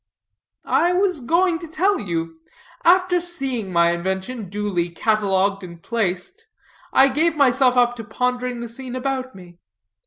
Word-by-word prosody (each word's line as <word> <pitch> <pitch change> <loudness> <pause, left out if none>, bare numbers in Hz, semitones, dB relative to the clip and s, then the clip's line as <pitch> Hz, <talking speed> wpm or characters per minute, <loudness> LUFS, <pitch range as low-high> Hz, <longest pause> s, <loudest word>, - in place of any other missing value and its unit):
"I 350 +2 +2
was 370 -3 +1
going 335 +6 +2
to 335 - -8
tell 375 +6 +1
you. 165 -3 -4 0.4
After 360 0 +4
seeing 270 - -3
my 170 -1 +3
invention 190 +5 -4
duly 195 -4 -2
catalogued 195 0 0
and 170 -2 -10
placed, 185 -3 -3 0.4
I 270 - +6
gave 310 +4 +1
myself 260 -2 +3
up 245 0 +3
to 225 - -6
pondering 250 +2 -2
the 235 - -5
scene 255 +2 -7
about 260 -1 -3
me. 175 -2 -14
245 Hz, 145 wpm, -21 LUFS, 190-285 Hz, 0.4 s, I